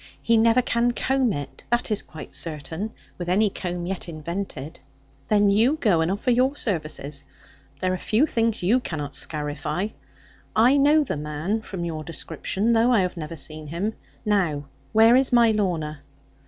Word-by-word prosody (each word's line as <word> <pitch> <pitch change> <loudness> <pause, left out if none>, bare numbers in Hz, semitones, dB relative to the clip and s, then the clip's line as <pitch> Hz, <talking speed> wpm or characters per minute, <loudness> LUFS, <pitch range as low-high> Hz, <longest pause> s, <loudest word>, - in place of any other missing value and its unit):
He 230 - +2
never 230 +2 +5
can 235 0 +1
comb 265 -1 +1
it, 145 -5 -5
that 240 -1 +1
is 210 - +1
quite 150 -2 -11
certain, 160 +6 -4 0.3
with 175 -1 -3
any 200 +3 +3
comb 175 -2 -4
yet 185 -1 -4
invented.' 165 -1 -5 0.5
'Then 205 -1 +4
you 235 +9 +3
go 185 -8 +3
and 160 - +1
offer 205 +6 0
your 255 +4 +3
services. 155 - -3 0.6
There 185 0 +1
are 185 - -3
few 225 +7 +2
things 230 - 0
you 225 +8 +4
cannot 150 - -4
scarify. 150 +6 -2 0.7
I 245 +6 +5
know 295 +2 +5
the 250 - -3
man 150 +9 -2
from 185 -5 -5
your 160 -2 -4
description, 175 +7 -1
although 230 +2 +4
I 225 -5 +5
have 180 0 -1
never 165 -1 -6
seen 155 +1 -5
him. 180 +8 -2 0.3
Now 175 -9 +1 0.3
where 225 +2 +6
is 265 0 +3
my 235 -2 +6
Lorna?' 165 -8 -1
195 Hz, 170 wpm, -24 LUFS, 160-230 Hz, 0.7 s, where